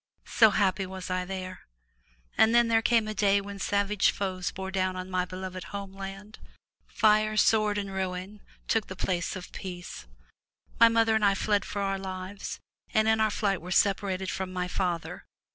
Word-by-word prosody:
So 220 -2 +5
happy 195 -2 +1
was 185 0 -7
I 185 0 -1
there! 185 -1 -7 0.7
And 225 +1 +4
then 240 -1 +5
there 225 -1 +4
came 225 -1 +2
a 215 - -3
day 200 -1 +3
when 200 0 -8
savage 200 +1 +2
foes 185 -3 -2
bore 190 0 -6
down 185 -1 0
on 185 0 -6
my 180 0 0
beloved 185 0 -7
homeland. 195 +1 -8 0.5
Fire, 215 0 +3
sword 215 -1 +3
and 200 -1 -3
ruin 190 +2 -4 0.3
took 225 -2 +1
the 185 - -7
place 175 -1 -2
of 185 -1 -8
peace. 175 - -8 0.7
My 230 0 +8
mother 225 -1 +3
and 220 -1 +1
I 200 -1 +4
fled 205 0 +1
for 200 - -3
our 195 0 -1
lives, 190 +1 -6 0.3
and 215 0 +2
in 220 0 +3
our 220 0 +3
flight 200 -3 -1
were 180 - -9
separated 190 0 +1
from 190 -1 -4
my 180 -1 -2
father. 180 -2 -3
195 Hz, 180 wpm, -28 LUFS, 185-210 Hz, 0.7 s, My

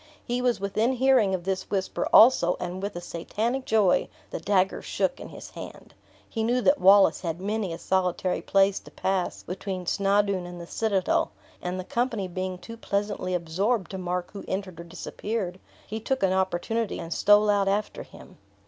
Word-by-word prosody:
He 245 +1 -1
was 245 -3 +1
within 215 +6 0
hearing 255 -6 +3
of 175 - -6
this 190 0 -3
whisper 190 -2 -1
also, 220 -7 +6
and, 180 +1 -4
with 200 -1 -4
a 175 - -5
Satanic 225 +10 -3
joy, 215 -4 +3 0.2
the - - -4
dagger 190 +2 +1
shook - - -1
in - - -8
his - - -10
hand. - - -10 0.3
He 225 - -3
knew 240 +3 +2
that 280 +4 +3
Wallace 195 +2 +6
had 170 -1 -3
many 205 -1 -2
a 165 - -4
solitary 185 0 0
place 195 0 +3
to - - -15
pass 190 -1 -2
between 185 0 -5
Snawdoun 200 -1 +1
and 175 0 -8
the 170 - -7
citadel; 200 0 0 0.3
and 180 +1 -3
the - - -3
company 230 -2 -1
being 185 +1 -4
too 230 +5 -10
pleasantly 200 -4 -2
absorbed 185 +4 -1
to 190 - -5
mark 180 0 -3
who 200 - -8
entered 190 -3 -4
or 170 - -8
disappeared, 185 +2 -4 0.3
he 220 +2 -5
took 260 +1 -2
an 190 -1 +3
opportunity, 190 +4 -1
and 165 - -4
stole 205 +1 +5
out 200 -1 +2
after 205 +2 -1
him. - - -14
195 Hz, 185 wpm, -26 LUFS, 180-215 Hz, 0.3 s, also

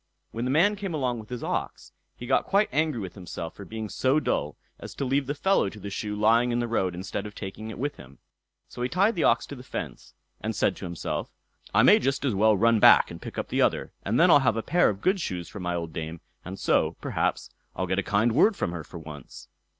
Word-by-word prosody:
When 115 +2 -3
the - - -1
man 175 +10 +4
came 195 -5 -4
along 125 -5 -1
with 110 - -11
his 125 -2 -5
ox, - - -4 0.2
he 120 - -9
got - - +1
quite 200 +2 +3
angry 155 -4 0
with 95 -4 -6
himself 85 -3 -7
for 100 - -10
being 110 +1 -5
so 130 +7 +1
dull 150 - -2 0.2
as - - -9
to 140 - -2
leave 135 +1 0
the 145 - -2
fellow 190 - +2
to 105 - -12
the 100 0 -7
shoe 105 +1 -3
lying 115 +3 +3
in 120 - 0
the 120 0 -1
road 95 -6 0
instead 95 +3 -4
of 105 - -12
taking 110 +3 -7
it 110 - -7
with 145 +3 -3
him; 70 0 -14 0.5
so - - -9
he 125 - 0
tied 200 - +2
the 170 - -1
ox 115 - +3
to 145 - -8
the 125 - -10
fence, 130 - -7 0.3
and - - -3
said - - +1
to - - -7
himself, 85 -1 -4 0.4
"I - - +4
may - - +7
just 135 +2 -1
as 130 - +1
well 105 +1 +4
run 115 +1 +4
back - - +7
and - - -9
pick - - -8
up - - -3
the - - +1
other, - - +1
and 110 +5 0
then 175 +1 +6
I'll 145 - +8
have 125 -5 +1
a 115 - -2
pair 175 +4 +3
of 100 -1 -4
good 190 +1 +2
shoes 90 - -4
for 100 - -9
my 90 -1 -2
old 85 -2 -4
dame, 80 +1 -5 0.2
and 95 +2 -7
so, - - +1
perhaps, - - -2 0.2
I'll 95 - -1
get 95 +2 0
a - - +2
kind 105 +4 +1
word 195 - +4
from 130 - -2
her 85 -2 -5
for 85 - -11
once." 75 -4 -11
115 Hz, 260 wpm, -26 LUFS, 95-140 Hz, 0.5 s, I'll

